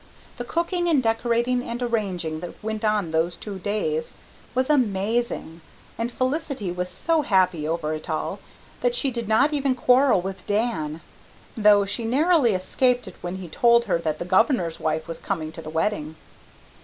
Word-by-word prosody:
The 245 Hz, -, -4 dB
cooking 345 Hz, +6 st, -1 dB
and 300 Hz, -6 st, +3 dB
decorating 235 Hz, +2 st, +1 dB
and 235 Hz, -1 st, -5 dB
arranging 195 Hz, -10 st, -2 dB
that 175 Hz, +1 st, -7 dB
went 220 Hz, 0 st, -3 dB
on 210 Hz, -6 st, +1 dB
those 165 Hz, +2 st, +1 dB
two 200 Hz, 0 st, -7 dB
days 165 Hz, -6 st, -2 dB, 0.4 s
was 255 Hz, 0 st, +2 dB
amazing, 220 Hz, -, 0 dB, 0.3 s
and 230 Hz, +2 st, -3 dB
Felicity 260 Hz, -, -2 dB
was 180 Hz, 0 st, -3 dB
so 320 Hz, -, +1 dB
happy 185 Hz, -, +2 dB
over 160 Hz, -1 st, -1 dB
it 155 Hz, +1 st, -7 dB
all 155 Hz, -, -2 dB, 0.4 s
that -, -, +1 dB
she 280 Hz, -, +1 dB
did 235 Hz, -3 st, -4 dB
not 270 Hz, +8 st, +3 dB
even 275 Hz, -3 st, +1 dB
quarrel 255 Hz, -2 st, +4 dB
with 190 Hz, 0 st, -6 dB
Dan 170 Hz, -8 st, -1 dB, 0.5 s
though 205 Hz, -2 st, +5 dB
she 205 Hz, +4 st, -2 dB
narrowly 270 Hz, -, +3 dB
escaped 245 Hz, +7 st, +1 dB
it -, -, -9 dB
when 175 Hz, +1 st, -4 dB
he 190 Hz, -2 st, -7 dB
told 235 Hz, +7 st, +4 dB
her 185 Hz, -5 st, +1 dB
that 155 Hz, -2 st, -2 dB
the 175 Hz, -, -5 dB
Governor's 185 Hz, -, +2 dB
wife 155 Hz, 0 st, -1 dB
was 165 Hz, -, -6 dB
coming 160 Hz, -5 st, -3 dB
to 165 Hz, -, -9 dB
the 155 Hz, -, -8 dB
wedding. 160 Hz, -1 st, -1 dB
210 Hz, 170 wpm, -24 LUFS, 170-245 Hz, 0.5 s, though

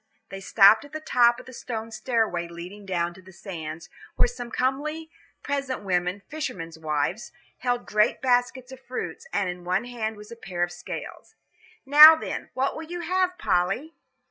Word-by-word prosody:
They 195 Hz, -, -7 dB
stopped 205 Hz, +3 st, +6 dB
at 285 Hz, +1 st, -15 dB
the 310 Hz, -, -3 dB
top 240 Hz, -5 st, +3 dB
of 255 Hz, -, -12 dB
the 255 Hz, -, -12 dB
stone 225 Hz, -2 st, -6 dB
stairway 215 Hz, -6 st, -1 dB
leading 180 Hz, +4 st, -10 dB
down 175 Hz, -2 st, -1 dB
to 185 Hz, -, -15 dB
the 185 Hz, +1 st, -15 dB
sands, 165 Hz, -4 st, -7 dB, 0.3 s
where -, -, +4 dB
some 360 Hz, -, -7 dB
comely 300 Hz, +6 st, -2 dB, 0.3 s
peasant 275 Hz, -5 st, -3 dB
women, 180 Hz, +1 st, -1 dB
fishermen's 185 Hz, -, -6 dB
wives, 155 Hz, +8 st, -2 dB, 0.3 s
held 245 Hz, -1 st, -1 dB
great 210 Hz, 0 st, +2 dB
baskets 250 Hz, 0 st, 0 dB
of 265 Hz, -, -10 dB
fruit, 255 Hz, -, -6 dB
and 195 Hz, -, 0 dB
in 180 Hz, 0 st, -6 dB
one 180 Hz, +5 st, 0 dB
hand 225 Hz, -3 st, -4 dB
was 210 Hz, +1 st, -12 dB
a -, -, -7 dB
pair 180 Hz, -6 st, -3 dB
of 175 Hz, -, -1 dB
scales. -, -, -8 dB, 0.5 s
"Now, 300 Hz, +3 st, +10 dB
then, 320 Hz, -, -5 dB
what 265 Hz, +1 st, 0 dB
will -, -, -6 dB
you 345 Hz, +2 st, -6 dB
have, 365 Hz, +1 st, 0 dB
Polly?" 195 Hz, -, 0 dB
230 Hz, 175 wpm, -25 LUFS, 180-265 Hz, 0.5 s, Now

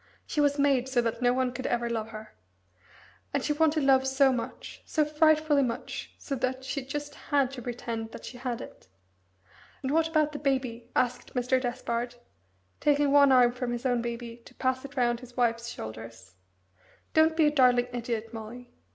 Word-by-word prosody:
She 300 Hz, -, 0 dB
was 285 Hz, 0 st, +2 dB
made 275 Hz, -3 st, +2 dB
so 260 Hz, -2 st, +1 dB
that 230 Hz, +1 st, -2 dB
no 245 Hz, 0 st, +4 dB
one 255 Hz, 0 st, +1 dB
could 255 Hz, +1 st, -4 dB
ever 240 Hz, 0 st, 0 dB
love 225 Hz, -2 st, -2 dB
her. 215 Hz, 0 st, -10 dB, 1.0 s
And 280 Hz, -, 0 dB
she 300 Hz, -, +1 dB
wanted 310 Hz, 0 st, +2 dB
love 265 Hz, -1 st, +4 dB
so 265 Hz, 0 st, +4 dB
much 245 Hz, +1 st, -6 dB
so 305 Hz, -, +1 dB
frightfully 305 Hz, -1 st, +3 dB
much, 240 Hz, -3 st, -4 dB
so 280 Hz, -, -6 dB
that 260 Hz, +1 st, -2 dB
she 270 Hz, +1 st, -3 dB
just 290 Hz, +2 st, -5 dB, 0.2 s
had 280 Hz, -4 st, +2 dB
to 265 Hz, -2 st, -7 dB
pretend 230 Hz, -2 st, -4 dB
that -, -, -9 dB
she 245 Hz, -, -9 dB
had 245 Hz, -2 st, -3 dB
it." -, -, -12 dB, 1.0 s
"And 265 Hz, -, -1 dB
what 320 Hz, +1 st, +3 dB
about 310 Hz, -2 st, +2 dB
the 290 Hz, -, -6 dB
Baby?" 255 Hz, -4 st, -1 dB
asked 250 Hz, +1 st, -1 dB
Mr. 250 Hz, +1 st, +1 dB
Despard, 240 Hz, -1 st, -3 dB, 0.6 s
taking 290 Hz, -1 st, +3 dB
one 285 Hz, -1 st, +6 dB
arm 250 Hz, -2 st, +6 dB
from 250 Hz, 0 st, -4 dB
his 240 Hz, +2 st, -4 dB
own 245 Hz, -2 st, +2 dB
baby 235 Hz, 0 st, -5 dB
to -, -, -16 dB
pass 260 Hz, 0 st, -1 dB
it 280 Hz, 0 st, -10 dB
round 240 Hz, -1 st, +2 dB
his 250 Hz, 0 st, -14 dB
wife's 235 Hz, -1 st, +1 dB
shoulders. 110 Hz, -2 st, -9 dB, 0.8 s
"Don't 315 Hz, 0 st, +4 dB
be 320 Hz, -, +5 dB
a 295 Hz, -, +4 dB
darling 250 Hz, -4 st, +4 dB
idiot, 230 Hz, -2 st, -3 dB
Molly. 235 Hz, +2 st, -8 dB
255 Hz, 185 wpm, -28 LUFS, 240-280 Hz, 1.0 s, one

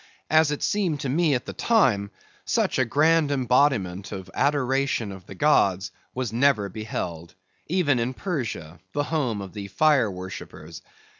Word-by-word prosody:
As 155 Hz, -1 st, +5 dB
it 150 Hz, -, -3 dB
seemed 180 Hz, -8 st, 0 dB
to 140 Hz, -, -2 dB
me 155 Hz, +1 st, +2 dB
at 125 Hz, -, -3 dB
the -, -, -6 dB
time, 120 Hz, -, +2 dB, 0.3 s
such -, -, 0 dB
a 130 Hz, -, +3 dB
grand 155 Hz, +5 st, +3 dB
embodiment 125 Hz, -8 st, +1 dB
of 95 Hz, -1 st, -7 dB
adoration 135 Hz, -5 st, 0 dB
of 95 Hz, -2 st, -11 dB
the 95 Hz, -, -9 dB
gods 95 Hz, -9 st, +2 dB, 0.2 s
was 125 Hz, -4 st, -3 dB
never 120 Hz, -5 st, +2 dB
beheld, 90 Hz, -5 st, -5 dB, 0.3 s
even 150 Hz, -7 st, +2 dB
in 125 Hz, +2 st, -2 dB
Persia, 115 Hz, -, -4 dB
the 145 Hz, -, 0 dB
home 135 Hz, -9 st, -1 dB
of 95 Hz, -2 st, -8 dB
the 100 Hz, -2 st, -6 dB
fire 135 Hz, +2 st, +3 dB
worshippers. 90 Hz, -4 st, -8 dB
125 Hz, 155 wpm, -25 LUFS, 100-145 Hz, 0.3 s, As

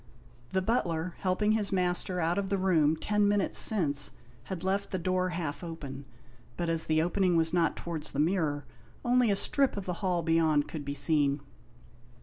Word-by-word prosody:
The 190 Hz, 0 st, 0 dB
butler, 175 Hz, -6 st, 0 dB
helping 200 Hz, +3 st, +1 dB
his 215 Hz, -2 st, 0 dB
master 180 Hz, -1 st, 0 dB
out 170 Hz, +3 st, +1 dB
of 195 Hz, -1 st, -3 dB
the 200 Hz, -, +1 dB
room 165 Hz, -5 st, +3 dB
ten 210 Hz, +5 st, +1 dB
minutes 205 Hz, -1 st, +1 dB
since, 145 Hz, -9 st, +2 dB, 0.4 s
had 185 Hz, -2 st, -6 dB
left 200 Hz, +1 st, -1 dB
the 190 Hz, -, -2 dB
door 185 Hz, +1 st, 0 dB
half 165 Hz, -2 st, -4 dB
open, 140 Hz, -5 st, -7 dB, 0.5 s
but 170 Hz, -1 st, -1 dB
as 165 Hz, -1 st, +1 dB
the 155 Hz, 0 st, +2 dB
opening 180 Hz, 0 st, +2 dB
was 165 Hz, 0 st, +1 dB
not 170 Hz, -3 st, +2 dB
towards 165 Hz, -3 st, -5 dB
the 140 Hz, -, -4 dB
mirror, 155 Hz, -3 st, 0 dB, 0.4 s
only 245 Hz, -1 st, +3 dB
a 200 Hz, -, +3 dB
strip 275 Hz, +4 st, +1 dB
of 200 Hz, -, -4 dB
the 180 Hz, -, -2 dB
hall 180 Hz, -3 st, 0 dB
beyond 160 Hz, -3 st, +2 dB
could 155 Hz, -3 st, -6 dB
be 140 Hz, 0 st, -4 dB
seen. 145 Hz, -1 st, +2 dB
175 Hz, 180 wpm, -29 LUFS, 160-190 Hz, 0.5 s, room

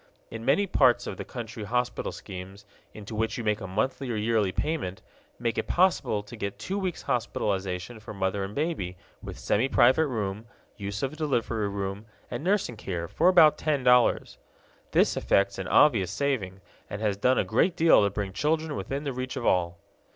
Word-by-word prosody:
In 115 Hz, 0 st, -6 dB
many 140 Hz, +11 st, +3 dB
parts 125 Hz, -9 st, +3 dB
of -, -, -5 dB
the -, -, -5 dB
country 115 Hz, -2 st, -7 dB
hospital 125 Hz, +4 st, -1 dB
schemes, 95 Hz, +1 st, -9 dB, 0.3 s
into 105 Hz, +1 st, -9 dB
which 110 Hz, +3 st, -1 dB
you 120 Hz, -, -4 dB
make 105 Hz, -1 st, 0 dB
a 95 Hz, -, -5 dB
monthly 125 Hz, +7 st, -2 dB
or 120 Hz, -, -1 dB
yearly 105 Hz, -2 st, +1 dB
payment, 140 Hz, -, -3 dB, 0.3 s
make 115 Hz, -2 st, -1 dB
it -, -, -3 dB
possible 175 Hz, -, +2 dB
to 105 Hz, +4 st, -11 dB
get 100 Hz, -2 st, -4 dB
two 195 Hz, -, -3 dB
weeks' 185 Hz, -3 st, -3 dB
hospitalization 100 Hz, -2 st, -2 dB
for 105 Hz, -, -10 dB
mother 95 Hz, -1 st, -1 dB
and 95 Hz, +2 st, -6 dB
baby, 140 Hz, -, -2 dB, 0.2 s
with -, -, -8 dB
semi 115 Hz, +6 st, +1 dB
private 130 Hz, +6 st, +4 dB
room, 105 Hz, -3 st, -3 dB, 0.3 s
use 100 Hz, +2 st, -5 dB
of 135 Hz, +3 st, -3 dB
delivery 120 Hz, -8 st, -1 dB
room, 100 Hz, +1 st, -4 dB, 0.2 s
and 120 Hz, +4 st, -4 dB
nursing 185 Hz, -, 0 dB
care, 85 Hz, -5 st, -4 dB
for 170 Hz, -, +3 dB
about 160 Hz, -5 st, +6 dB
ten 150 Hz, -4 st, 0 dB
dollars. 125 Hz, -1 st, +3 dB, 0.5 s
This -, -, +3 dB
effects 100 Hz, 0 st, +1 dB
an 95 Hz, -, -4 dB
obvious 110 Hz, -, +4 dB
saving, 100 Hz, -5 st, -2 dB, 0.3 s
and 100 Hz, -, -5 dB
has 105 Hz, -2 st, 0 dB
done 125 Hz, +6 st, +2 dB
a -, -, +3 dB
great 180 Hz, 0 st, +1 dB
deal 165 Hz, -7 st, +6 dB
to 100 Hz, -, +3 dB
bring 100 Hz, -1 st, -4 dB
children 155 Hz, -, 0 dB
within 140 Hz, +2 st, -4 dB
the 140 Hz, -2 st, -3 dB
reach 130 Hz, +1 st, -4 dB
of 120 Hz, -, -4 dB
all. 85 Hz, -1 st, +1 dB
115 Hz, 190 wpm, -27 LUFS, 100-135 Hz, 0.5 s, about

